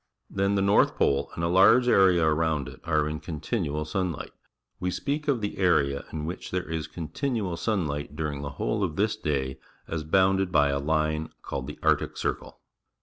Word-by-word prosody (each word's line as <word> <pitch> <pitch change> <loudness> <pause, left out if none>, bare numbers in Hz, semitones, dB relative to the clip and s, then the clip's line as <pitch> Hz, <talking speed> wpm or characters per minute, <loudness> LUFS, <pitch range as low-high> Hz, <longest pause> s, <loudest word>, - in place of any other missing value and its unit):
Then 100 +1 +1
the 100 - +2
norfh 100 +1 +4
pole 70 - +1
and 85 - -3
a^JjTge 100 +8 +5
area 95 -7 +5
around 80 -3 +1
it - - -11
are 75 -3 +1
in 75 0 -3
continual 75 -2 -3
sun 90 +3 -1
light. 75 - -7 0.5
We 90 - -1
speak 145 +10 -2
o 140 - +4
f 115 - -7
the 105 -1 -4
area 70 -7 +2
in 75 -1 -4
which 85 +3 -5
there 90 -1 -2
is 80 -1 -3
con 80 -2 -7
tinual 110 - -2
sunlight 75 -8 -2
durijig_J^he 75 -2 -4
whole 105 +8 -1
of 80 -5 -2
this 105 +4 +1
day 70 -9 -2 0.3
as 80 -1 -3
bounded 95 +3 +2
by 70 -4 +4
a 70 0 0
lin 75 +1 0
e - - -24
called 65 - -4
the - - -7
Arctic - - +1
Circle. - - -3
80 Hz, 195 wpm, -27 LUFS, 75-95 Hz, 0.5 s, a^JjTge